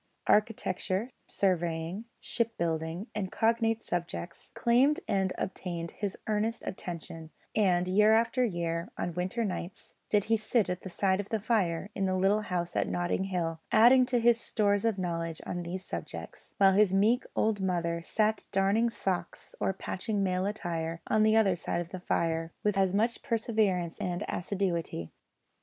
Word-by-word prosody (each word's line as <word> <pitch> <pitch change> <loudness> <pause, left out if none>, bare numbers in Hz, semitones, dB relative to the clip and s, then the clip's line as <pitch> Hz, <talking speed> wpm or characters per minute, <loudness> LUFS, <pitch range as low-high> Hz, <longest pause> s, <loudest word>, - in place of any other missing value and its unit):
Architecture, 210 0 +1 0.2
surveying, 175 +1 -1
shipbuilding, 170 -6 -2
and 195 -3 -3
cognate 225 0 +1
subjects, 170 0 -4
claimed 255 +5 +3
and 195 -2 +1
obtained 170 -3 -4
his 205 -2 -4
earnest 220 +2 -1
attention; 165 -3 -6 0.3
and 180 -4 +3
year 210 +3 +5
after 230 +3 +3
year, 170 -5 -2
on 175 - -2
winter 185 +7 -1
nights, 185 -2 -6 0.2
did 210 -2 +3
he 225 +2 +2
sit 215 -1 +1
at 180 - -4
the 190 - -7
side 190 +1 +1
of 205 - -4
the 220 - 0
fire 195 -4 0
in 195 -1 0
the 185 0 +1
little 195 +3 +3
house 180 -4 -3
at - - +1
Notting 175 +2 -1
Hill, 165 -4 -2
adding 245 +3 +7
to 250 -1 +1
his 235 0 +4
stores 205 -1 +1
of 225 -3 +1
knowledge 165 -3 -2
on 175 - -3
these 180 +2 -5
subjects; - - -7
while 195 -1 +6
his 205 -1 +4
meek 215 +6 +3
old 215 -2 +1
mother 170 -3 0
sat 215 +5 0
darning 200 +4 +3
socks 190 -5 -3
or - - +1
patching 200 +2 -2
male 185 0 0
attire 165 -5 -3
on 215 - +2
the 215 0 +5
other 205 -5 +4
side 170 0 -2
of 170 -1 -4
the 185 - -6
fire 165 -2 -1
with 210 - +2
full 195 - +2
as 185 - -2
much 225 +4 +1
perseverance 215 -8 0
and 180 +2 -2
assiduity. 175 - -2
195 Hz, 165 wpm, -30 LUFS, 175-215 Hz, 0.3 s, adding